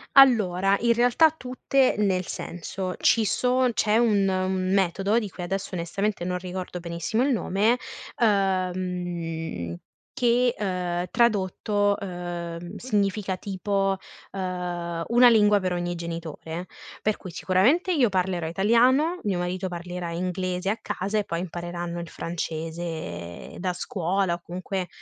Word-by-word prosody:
Allora, 200 Hz, -7 st, +6 dB
in 235 Hz, 0 st, +3 dB
realtà, 245 Hz, +7 st, +5 dB
tutte 260 Hz, -2 st, +1 dB
nel 190 Hz, -3 st, +1 dB
senso: 180 Hz, +2 st, -5 dB
ci 225 Hz, -, +4 dB
so 250 Hz, +4 st, +2 dB
c'è 215 Hz, 0 st, +2 dB
un 210 Hz, -4 st, +3 dB
un 185 Hz, 0 st, 0 dB
metodo, 195 Hz, +4 st, +2 dB
di 210 Hz, -3 st, -4 dB
cui 180 Hz, -1 st, -7 dB
adesso 195 Hz, +1 st, -3 dB
onestamente 180 Hz, +3 st, -2 dB
non 180 Hz, 0 st, -1 dB
ricordo 180 Hz, 0 st, -5 dB
benissimo 170 Hz, +8 st, -1 dB
il 280 Hz, -, +2 dB
nome, 215 Hz, +3 st, +2 dB, 0.4 s
uhm, 180 Hz, -, -1 dB, 0.4 s
che, 245 Hz, 0 st, +2 dB
uhm, 180 Hz, -3 st, -1 dB
tradotto, 205 Hz, -2 st, +2 dB
uhm, 175 Hz, -1 st, -5 dB
significa 205 Hz, -4 st, 0 dB
tipo, 195 Hz, 0 st, -1 dB, 0.3 s
uhm: 175 Hz, -3 st, -3 dB
"una 240 Hz, +1 st, +7 dB
lingua 210 Hz, -2 st, +5 dB
per 185 Hz, -1 st, -1 dB
ogni 175 Hz, 0 st, -2 dB
genitore", 170 Hz, 0 st, -5 dB, 0.4 s
per 215 Hz, 0 st, +1 dB
cui 185 Hz, -, -9 dB
sicuramente 240 Hz, -, +2 dB
io 255 Hz, -8 st, +4 dB
parlerò 185 Hz, -3 st, 0 dB
italiano, 245 Hz, -, +3 dB
mio 195 Hz, -4 st, 0 dB
marito 180 Hz, +2 st, -2 dB
parlerà 175 Hz, 0 st, -5 dB
inglese 185 Hz, +2 st, -1 dB
a 220 Hz, -, -2 dB
casa 200 Hz, +3 st, -1 dB
e 205 Hz, -, -2 dB
poi 170 Hz, +1 st, -2 dB
impareranno 175 Hz, -1 st, -5 dB
il 170 Hz, -2 st, -6 dB
francese 160 Hz, -, -5 dB
da 185 Hz, 0 st, 0 dB
scuola 185 Hz, +1 st, -1 dB
o 170 Hz, -, -5 dB
comunque 185 Hz, +1 st, -4 dB
185 Hz, 130 wpm, -26 LUFS, 175-210 Hz, 0.4 s, una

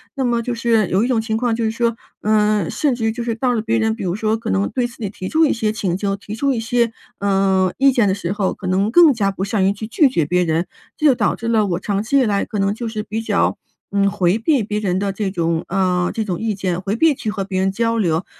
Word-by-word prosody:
那 270 Hz, -2 st, -1 dB
么 240 Hz, -1 st, +1 dB
就 245 Hz, +1 st, -3 dB
是 230 Hz, -3 st, +1 dB
有 190 Hz, -, +2 dB
一 -, -, +1 dB
种 245 Hz, -3 st, +1 dB
情 220 Hz, 0 st, -2 dB
况 235 Hz, -1 st, 0 dB
就 230 Hz, -, -2 dB
是 220 Hz, -, +1 dB
说， 235 Hz, 0 st, 0 dB, 0.3 s
嗯， 210 Hz, -3 st, +2 dB
甚 290 Hz, -4 st, 0 dB
至 235 Hz, -2 st, -3 dB
于 220 Hz, -, +2 dB
就 235 Hz, +1 st, -4 dB
是 235 Hz, -1 st, -1 dB
到 245 Hz, +2 st, 0 dB
了 225 Hz, -, 0 dB
别 225 Hz, +1 st, 0 dB
人 220 Hz, 0 st, +1 dB
比 -, -, -6 dB
如 175 Hz, -2 st, -1 dB
说 215 Hz, +2 st, 0 dB
可 225 Hz, -, -5 dB
能 95 Hz, +1 st, +1 dB
对 250 Hz, -, -1 dB
自 240 Hz, -, -8 dB
己 210 Hz, -4 st, -4 dB
提 185 Hz, -1 st, -7 dB
出 320 Hz, 0 st, +3 dB
一 290 Hz, -, +2 dB
些 220 Hz, -2 st, -1 dB
请 195 Hz, -5 st, -2 dB
求、 195 Hz, 0 st, -2 dB
提 205 Hz, +1 st, -8 dB
出 275 Hz, +4 st, +1 dB
一 235 Hz, -, -2 dB
些， 235 Hz, +1 st, +1 dB, 0.3 s
嗯， 195 Hz, -2 st, +2 dB
意 275 Hz, +1 st, +5 dB
见 240 Hz, -4 st, +3 dB
的 -, -, +2 dB
时 190 Hz, -2 st, -3 dB
候， 200 Hz, -2 st, -1 dB
可 185 Hz, -, -7 dB
能 195 Hz, +4 st, +1 dB
更 325 Hz, +1 st, +7 dB
加 200 Hz, -4 st, 0 dB
不 195 Hz, 0 st, -3 dB
善 200 Hz, -1 st, 0 dB
于 195 Hz, -, +3 dB
去 210 Hz, +2 st, -6 dB
拒 275 Hz, +5 st, +3 dB
绝 170 Hz, -, 0 dB
别 180 Hz, +4 st, +1 dB
人。 165 Hz, +1 st, 0 dB, 0.3 s
这 310 Hz, -, -1 dB
就 270 Hz, -, +5 dB
导 -, -, +1 dB
致 230 Hz, -, -6 dB
了 225 Hz, -2 st, +2 dB
我 175 Hz, -2 st, -1 dB
长 200 Hz, +1 st, -2 dB
期 260 Hz, +5 st, +1 dB
以 -, -, +4 dB
来 205 Hz, -2 st, +1 dB
可 210 Hz, -, -4 dB
能 195 Hz, +1 st, +1 dB
就 230 Hz, +2 st, -5 dB
是 215 Hz, -1 st, -4 dB
比 220 Hz, +1 st, -4 dB
较， 225 Hz, -, 0 dB, 0.3 s
嗯， 200 Hz, 0 st, +2 dB
回 185 Hz, -1 st, +1 dB
避 275 Hz, +2 st, +2 dB
别 210 Hz, +1 st, -2 dB
人 185 Hz, -4 st, -1 dB
的 200 Hz, 0 st, -1 dB
这 200 Hz, 0 st, -2 dB
种 165 Hz, -2 st, -1 dB
嗯， 180 Hz, -1 st, +1 dB
这 220 Hz, -, -2 dB
种 180 Hz, -4 st, -2 dB
意 225 Hz, -1 st, -1 dB
见， 185 Hz, -2 st, -2 dB
回 195 Hz, +2 st, -2 dB
避 320 Hz, +3 st, +4 dB
去 220 Hz, -, -4 dB
和 205 Hz, -2 st, -3 dB
别 190 Hz, -1 st, -2 dB
人 190 Hz, 0 st, +1 dB
交 230 Hz, +3 st, 0 dB
流。 170 Hz, -4 st, 0 dB
215 Hz, 310 characters per minute, -19 LUFS, 190-230 Hz, 0.3 s, 更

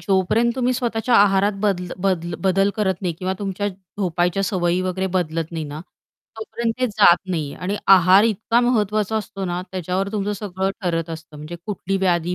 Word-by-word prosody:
जोपर्यंत 200 Hz, +5 st, +2 dB
तुम्ही 255 Hz, 0 st, +1 dB
स्वतःच्या 240 Hz, -1 st, 0 dB
आहारात 200 Hz, 0 st, +4 dB
बद 200 Hz, -4 st, +1 dB, 0.3 s
बद 180 Hz, -3 st, +1 dB, 0.2 s
बदल 195 Hz, +2 st, +3 dB
करत 190 Hz, -3 st, -1 dB
नाही 175 Hz, -3 st, -1 dB
किंवा 185 Hz, 0 st, -2 dB
तुमच्या 200 Hz, 0 st, -2 dB
झोपायच्या 180 Hz, -1 st, -2 dB
सवयी 180 Hz, -2 st, 0 dB
वगैरे 185 Hz, +1 st, -1 dB
बदलत 165 Hz, -1 st, -2 dB
नाही 160 Hz, -2 st, -3 dB
ना, 145 Hz, +1 st, -7 dB, 0.6 s
तोपर्यंत 225 Hz, +1 st, -3 dB
ते 255 Hz, -, +3 dB
जात 205 Hz, -6 st, +5 dB
नाही 155 Hz, -5 st, -2 dB
आणि 190 Hz, +3 st, -3 dB, 0.2 s
आहार 185 Hz, +3 st, +6 dB
इतका 230 Hz, +2 st, +1 dB
महत्त्वाचा 215 Hz, -3 st, +1 dB
असतो 200 Hz, -2 st, -4 dB
ना, 175 Hz, -1 st, -2 dB
त्याच्यावर 185 Hz, +1 st, -2 dB
तुमचं 205 Hz, -1 st, -1 dB
सगळं 190 Hz, -1 st, -2 dB
ठरत 165 Hz, -2 st, -1 dB
असतं 160 Hz, -1 st, -9 dB
म्हणजे 155 Hz, +4 st, -8 dB
कुठली 195 Hz, -2 st, -2 dB
व्याधी 180 Hz, -2 st, +1 dB
190 Hz, 170 wpm, -21 LUFS, 175-210 Hz, 0.6 s, आहार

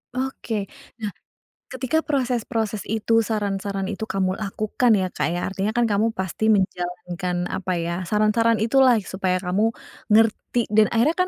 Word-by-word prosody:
Oke, 235 Hz, -6 st, -3 dB, 0.3 s
nah 210 Hz, -, -2 dB, 0.6 s
ketika 260 Hz, +4 st, 0 dB
proses-proses 235 Hz, -6 st, -1 dB
itu 225 Hz, +1 st, +2 dB
saran-saran 200 Hz, -2 st, -2 dB
itu 215 Hz, +1 st, -4 dB
kamu 190 Hz, -1 st, 0 dB
lakukan 215 Hz, +3 st, +1 dB
ya, 190 Hz, -2 st, 0 dB
Kak, 150 Hz, -, -1 dB
ya, 175 Hz, +1 st, -2 dB
artinya 195 Hz, +2 st, -1 dB
kan 240 Hz, -, +3 dB
kamu 210 Hz, +2 st, +2 dB
pasti 190 Hz, +3 st, -1 dB
menjalankan, 180 Hz, -2 st, -2 dB
apa 185 Hz, -1 st, -2 dB
ya 170 Hz, +1 st, -2 dB
saran-saran 215 Hz, +2 st, +3 dB
itulah 250 Hz, +2 st, +5 dB
supaya 185 Hz, -1 st, -1 dB
kamu 195 Hz, +5 st, +1 dB, 0.4 s
ngerti 225 Hz, +2 st, +2 dB
dan 215 Hz, 0 st, +5 dB
akhirnya 250 Hz, +8 st, +2 dB
210 Hz, 140 wpm, -23 LUFS, 190-230 Hz, 0.6 s, itulah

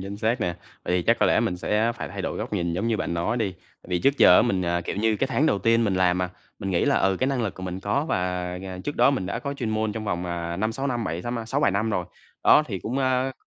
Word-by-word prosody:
Chính 100 Hz, +1 st, -6 dB
xác 115 Hz, +3 st, 0 dB
nè, 90 Hz, -4 st, -1 dB, 0.3 s
tại 90 Hz, -, 0 dB
vì 90 Hz, -, +1 dB
chắc -, -, +3 dB
có -, -, +4 dB
lẽ -, -, +3 dB
mình 90 Hz, -, -1 dB
sẽ 110 Hz, +5 st, +1 dB
phải -, -, -6 dB
thay -, -, -6 dB
đổi -, -, -3 dB
góc -, -, -5 dB
nhìn 85 Hz, -4 st, -1 dB
giống 95 Hz, +7 st, -1 dB
như 115 Hz, -, +1 dB
bạn 90 Hz, -, -2 dB
nói 95 Hz, +8 st, -1 dB
đi, 110 Hz, -5 st, 0 dB
tại 90 Hz, -, -23 dB
vì 90 Hz, -1 st, 0 dB
trước 140 Hz, +1 st, +2 dB
giờ 90 Hz, -, +8 dB
á -, -, +6 dB
mình, 95 Hz, -6 st, 0 dB
à, 85 Hz, 0 st, 0 dB
kiểu 85 Hz, -, -5 dB
như, 110 Hz, +1 st, +1 dB
cái 135 Hz, -, 0 dB
tháng 145 Hz, +3 st, +1 dB
đầu 100 Hz, -, +2 dB
tiên 115 Hz, +3 st, +3 dB
mình 100 Hz, -3 st, +1 dB
làm 90 Hz, -1 st, +2 dB
mà, 90 Hz, 0 st, -1 dB, 0.3 s
mình 95 Hz, -, -3 dB
nghĩ 85 Hz, -, +2 dB
là, -, -, +3 dB
ừ, 95 Hz, 0 st, +2 dB
cái 130 Hz, -, +2 dB
năng 135 Hz, -3 st, 0 dB
lực 100 Hz, -, -2 dB
của 95 Hz, -, -10 dB
mình 90 Hz, 0 st, -4 dB
có, 105 Hz, +9 st, 0 dB
và, -, -, +1 dB, 0.4 s
à, 95 Hz, -1 st, -6 dB
trước 145 Hz, -, -3 dB
đó -, -, +5 dB
mình 130 Hz, -10 st, -2 dB
đã -, -, -3 dB
có 140 Hz, -1 st, -4 dB
chuyên 120 Hz, -5 st, -3 dB
môn 110 Hz, -1 st, 0 dB
trong 110 Hz, -1 st, -5 dB
vòng, 90 Hz, -3 st, -2 dB
à, 85 Hz, 0 st, -3 dB
5-6 115 Hz, +7 st, -2 dB
năm 120 Hz, -4 st, -1 dB
bảy, 85 Hz, +2 st, -3 dB
tám 120 Hz, +2 st, -3 dB
a, 115 Hz, -, -5 dB
6-7 135 Hz, +2 st, +1 dB
năm 105 Hz, +3 st, 0 dB
rồi. 90 Hz, -4 st, -1 dB, 0.4 s
Đó, 150 Hz, -, +7 dB
thì 100 Hz, -6 st, -4 dB
cũng, 120 Hz, +9 st, -3 dB
a, 130 Hz, 0 st, +1 dB
105 Hz, 310 wpm, -25 LUFS, 90-120 Hz, 0.4 s, giờ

